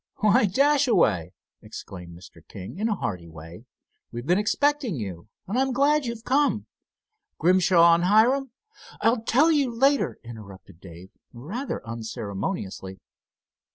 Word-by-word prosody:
"Why, 215 +3 +4
Dashaway!" 240 - +2 0.3
exclaimed 85 -2 -10
Mr. 85 - -15
King, 95 - -9
in 220 +2 0
a 210 - 0
hearty 90 - -5
way. 80 +7 -12 0.5
"We've 120 +1 -7
been 180 +5 +2
expecting 285 - 0
you, 100 -6 -7 0.2
and 220 +7 -2
I'm 265 0 +1
glad 280 +2 +2
you've 235 -1 -6
come. 285 +4 +1 0.7
Grimshaw 175 0 +4
and 170 +1 +1
Hiram——" 245 +7 +3 0.5
"I'll 230 0 +2
tell 275 +8 +3
you 285 -4 +2
later," 270 +4 +1
interrupted 100 -6 -12
Dave, 90 +1 -13 0.2
rather 170 - -6
unceremoniously. 100 - -5
185 Hz, 125 wpm, -25 LUFS, -, 0.7 s, Why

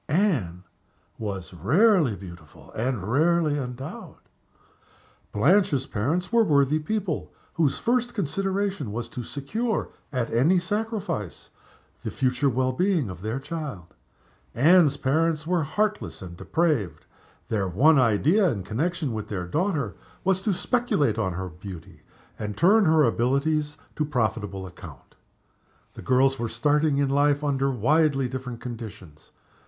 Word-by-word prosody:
Anne 140 - +1 0.6
was 95 -4 -5
rarely 150 - +3
beautiful 85 -4 -13
and 120 -3 -2
rarely 155 +3 +2
endowed. 125 0 -7 1.2
Blanche's 145 - +3
parents 165 - -2
were 230 -1 +6
worthy 145 -4 +3
people, 185 +1 -3 0.2
whose 155 -4 +1
first 245 0 0
consideration 195 - -2
was 115 +2 -4
to 120 - -7
secure, 200 - -3 0.2
at 125 -5 -2
any 145 +11 +4
sacrifice, 200 - -3 0.5
the - - -4
future 130 +1 +1
well 130 +1 +1
being 170 - 0
of 90 -1 -10
their 110 +6 -3
child. 135 - -6 0.6
Anne's 155 +2 +5
parents 155 +3 +1
were 175 0 +1
heartless 155 - -2
and 85 -2 -9
depraved. 150 - -1 0.4
Their 100 -4 0
one 135 - +4
idea, 145 - +3
in 105 -9 -3
connection 145 - -2
with 110 -1 -4
their 90 -4 -4
daughter, 150 - -1 0.3
was 190 0 +1
to 205 - 0
speculate 155 - +1
on 95 -4 -1
her 95 +1 -4
beauty, 90 -1 -10 0.4
and 105 -1 -4
to - - -10
turn 205 +4 +6
her 160 -1 +5
abilities 140 +5 +1 0.2
to 155 - +1
profitable 110 -8 -2
account. 90 -1 -12 0.8
The - - -10
girls 135 +1 +2
were 115 -1 -2
starting 145 +5 +1
in 140 -1 +1
life 145 +1 +2
under 135 -1 +1
widely 135 +2 +2
different 125 -2 -6
conditions. 105 -10 -9
140 Hz, 135 wpm, -25 LUFS, 110-170 Hz, 1.2 s, were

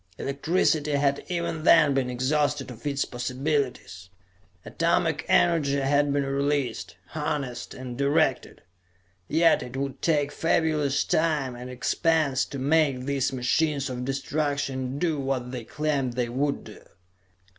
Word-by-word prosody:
Electricity 150 +1 0
had 140 0 +1
even 170 -2 -2
then 155 -4 +6
been 135 -2 0
exhausted 145 +2 0
of 120 +4 -8
its 140 -1 0
possibilities. 125 - -3 0.6
Atomic 165 -1 0
energy 165 -6 +3
had 145 +1 +2
been 140 0 +1
released, 140 -2 -1
harnessed, 145 -5 -4
and 130 -1 -7
directed. 140 +1 +1 0.6
Yet 165 +1 +4
it 125 +2 -7
would 140 0 -4
take 145 -3 +1
fabulous 150 -3 +1
time 150 -6 0
and 125 +1 -8
expense 140 +2 +1
to 140 - -7
make 140 -1 +2
these 135 0 -1
machines 140 +2 0
of 125 0 -4
destruction 135 -1 -2
do 160 -2 0
what 135 -2 -2
they 125 -3 -6
claimed 145 -4 -1
they 120 -1 -1
would 140 +4 -1
do. - - -12
140 Hz, 130 wpm, -26 LUFS, 130-150 Hz, 0.6 s, then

